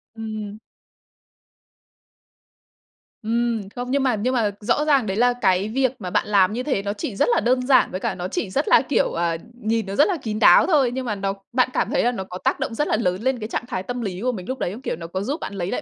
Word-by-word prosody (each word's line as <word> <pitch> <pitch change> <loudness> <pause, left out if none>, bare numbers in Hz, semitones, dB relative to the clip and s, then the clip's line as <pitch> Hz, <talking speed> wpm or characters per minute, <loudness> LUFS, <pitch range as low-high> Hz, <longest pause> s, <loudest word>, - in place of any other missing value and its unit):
Ừm. 215 -2 -6 2.7
Ừm, 230 -2 -1
không, 250 +1 -4
nhưng 275 0 +2
mà 250 -4 +2
nhưng 245 +5 -1
mà 220 -4 +1
rõ 240 +8 +1
ràng 275 -6 +3
đấy 195 +1 -2
là 245 +1 +4
cái 190 +1 +2
việc 260 +1 +1
mà 185 -3 -5
bạn 200 - 0
làm 200 -1 +3
như 250 +2 -2
thế 260 -9 0
nó 200 0 -2
chỉ 205 0 -5
rất 240 - +2
là - - +3
đơn 250 +3 +1
giản, 265 - +4
với 185 - -3
cả 215 -4 -2
nó 180 0 -4
chỉ 190 - -3
rất 280 - -1
là, - - +6
kiểu, - - +1
ờ, 170 -1 -1 0.2
nhìn 220 0 0
nó 195 +1 -5
rất 295 - +5
là 375 -4 0
kín 215 -5 -4
đáo - - +7
thôi. 280 -8 +3
Nhưng 260 0 -3
mà 210 -3 -2
nó 195 0 -2 0.2
bạn 255 0 +3
cảm - - 0
thấy - - +1
là 245 - +3
nó 190 -6 -4
có 180 -1 -8
tác - - -1
động - - -3
rất 295 - 0
là - - +2
lớn 185 -3 -1
lên 260 0 0
cái 215 +1 -5
trạng 240 - -3
thái 185 - -3
tâm 245 +3 -4
lý 190 -2 -4
của 250 +1 +1
mình 185 -6 -7
lúc 260 0 -4
đấy 175 - -1
không? 230 +6 -8
Kiểu, - - -3
nó 165 0 -8
có 185 +3 -4
giúp 280 +10 -3
bạn - - -6
lấy 185 -1 -3
lại - - -2
225 Hz, 270 wpm, -22 LUFS, 195-255 Hz, 2.7 s, đáo